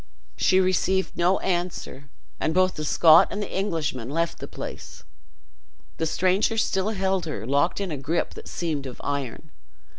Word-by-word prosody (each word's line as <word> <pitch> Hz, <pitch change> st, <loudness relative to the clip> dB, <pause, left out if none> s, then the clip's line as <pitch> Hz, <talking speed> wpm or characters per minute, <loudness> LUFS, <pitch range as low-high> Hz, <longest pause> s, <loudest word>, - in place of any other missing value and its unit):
She 185 Hz, -, +3 dB
received 190 Hz, 0 st, +1 dB
no 180 Hz, +2 st, +3 dB
answer, 175 Hz, -6 st, -3 dB, 0.3 s
and 160 Hz, -, -1 dB
both 185 Hz, 0 st, +3 dB
the 155 Hz, -, -5 dB
Scot 155 Hz, +1 st, +6 dB
and 205 Hz, -, -4 dB
the 205 Hz, -, -4 dB
Englishman 160 Hz, -, -2 dB
left 165 Hz, +3 st, -1 dB
the -, -, -6 dB
place. -, -, -8 dB, 0.9 s
The 160 Hz, -, 0 dB
stranger 185 Hz, +7 st, +1 dB
still 195 Hz, -2 st, +1 dB
held 190 Hz, -4 st, -1 dB
her 110 Hz, -9 st, -4 dB
locked 140 Hz, -, +1 dB
in 195 Hz, -3 st, -3 dB
a 150 Hz, -, -3 dB
gripe 155 Hz, +5 st, -2 dB
that -, -, -10 dB
seemed 155 Hz, -5 st, -3 dB
of 125 Hz, -, -9 dB
iron. 140 Hz, +2 st, -4 dB
170 Hz, 160 wpm, -25 LUFS, 150-190 Hz, 0.9 s, Scot